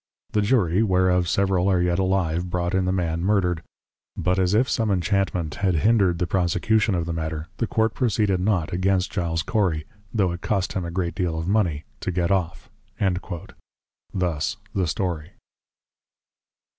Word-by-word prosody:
The 105 - +2
Jury, 100 -4 +2
whereof 90 -4 +2
several 95 -1 +2
are 95 -2 +3
yet 90 0 +1
alive 90 -2 0
brought 90 +1 -1
in 95 -1 +2
the 90 - +1
man 85 -3 -1
Murdered; 90 -4 +1 0.6
but 90 +1 +1
as 95 +2 +2
if 125 +4 +3
some 115 -3 0
Enchantment 95 -4 0
had 95 -3 +2
hindred 95 0 +3
the 90 - 0
Prosecution 95 +4 +1
of 85 -2 -1
the 85 - -3
Matter, 80 -1 -4
the 115 - -1
Court 110 0 +1
Proceeded 105 -6 +1
not 90 -5 0
against 95 +1 +1
Giles 85 -3 -1
Cory, 90 -9 0 0.3
tho' 100 -6 +1
it 85 +1 -6
cost 100 -3 -1
him 95 -2 -2
a - - -4
great 85 -1 -2
deal 90 -3 -1
of 80 +1 -3
Mony 95 -8 +1 0.2
to 95 - -2
get 90 +1 0
off.' 90 -4 -1 1.4
Thus 90 +2 -1 0.2
the 95 -3 0
Story. 85 0 -3
90 Hz, 165 wpm, -24 LUFS, 85-100 Hz, 1.4 s, are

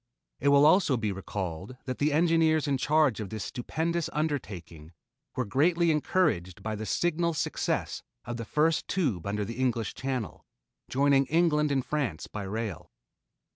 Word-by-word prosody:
It 140 - -1
will 140 +1 +6
also 155 -5 +5
be 110 -3 -1
recalled 95 +3 -5
that 130 -1 -4
the 150 +1 +2
engineers 160 -1 +3
in 135 -2 +1
charge 150 -5 +3
of 105 -3 -4
this 110 -2 -5
stupendous 165 +6 -2
undertaking 95 - -4 0.4
were 125 - -1
greatly 165 - +3
encouraged 150 - 0
by 110 0 -2
the 110 +1 -5
signal 170 - 0
success - - -1 0.2
of 120 0 -4
the 115 - -5
first 155 +6 +1
tube 130 - -1
under 105 +1 -1
the 115 +4 -6
English 120 -4 0
Channel, 130 -6 -4 0.5
joining 140 0 +3
England 150 -2 +2
and 135 -2 0
France 130 - -2
by 105 - -6
rail. 100 -2 -4
135 Hz, 155 wpm, -28 LUFS, 105-155 Hz, 0.5 s, will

